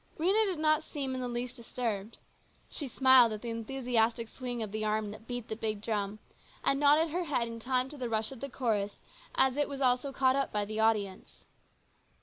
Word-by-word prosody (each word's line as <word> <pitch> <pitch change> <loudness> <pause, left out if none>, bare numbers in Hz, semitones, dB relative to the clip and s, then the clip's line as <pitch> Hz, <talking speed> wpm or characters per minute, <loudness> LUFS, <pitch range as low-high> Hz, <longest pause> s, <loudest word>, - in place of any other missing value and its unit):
Rhena 390 +7 +3
did 370 -4 -2
not 310 0 +3
seem 280 -4 -4
in 255 - -3
the 250 - -2
least 245 +1 -4
disturbed. 230 -3 -4 0.5
She 290 - -4
smiled 260 -2 +6
at 215 - -7
the 235 - -3
enthusiastic 230 -1 0
swing 245 -3 -4
of 210 - -6
the 215 +1 -3
arm 215 -1 0
that 215 +2 -12
beat 245 -2 -5
the 220 - -4
big 215 -1 -2
drum, 205 -1 -2 0.5
and 275 - +2
nodded 295 +2 +4
her 355 +2 -1
head 260 -6 +1
in 230 0 -7
time 255 +2 0
to 295 - -10
the 245 -2 -3
rush 220 0 -1
of 265 - -9
the 275 - -5
chorus 210 -6 -1 0.4
as 265 0 +4
it 290 -1 +1
was 280 -1 -5
also 255 +1 +2
caught 260 -1 +3
up 275 0 0
by 210 -1 0
the 215 +1 -4
audience. 210 -4 0
245 Hz, 210 wpm, -31 LUFS, 220-270 Hz, 0.5 s, smiled